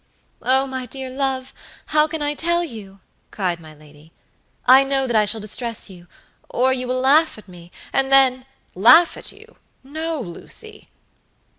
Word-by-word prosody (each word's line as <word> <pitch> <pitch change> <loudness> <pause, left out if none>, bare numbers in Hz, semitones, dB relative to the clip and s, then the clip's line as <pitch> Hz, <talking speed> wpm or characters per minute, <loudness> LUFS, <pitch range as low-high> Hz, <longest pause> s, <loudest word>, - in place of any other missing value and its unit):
"Oh, 260 +3 +3
my 260 -2 -5
dear 265 +1 -7
love, 265 -1 -3 0.4
how 305 0 +4
can 315 -1 -4
I 290 0 -1
tell 345 +3 0
you?" 205 - -10 0.3
cried 180 -4 -2
my 155 -2 -14
lady. 150 +1 -18 0.5
"I 260 +2 +7
know 270 0 0
that 240 -3 -2
I 215 -1 +4
shall 215 +1 0
distress 230 +2 -4
youor 190 +7 -4
you 255 -1 -4
will 255 +1 -1
laugh 295 +3 +4
at 215 - -15
me, 175 -1 -14 0.2
and 270 0 0
then" 260 -1 +4 0.3
"Laugh 250 - +6
at - - -6
you? - - -17 0.3
no, 315 +3 -4
Lucy." 175 -9 -6
255 Hz, 160 wpm, -21 LUFS, 210-275 Hz, 0.5 s, I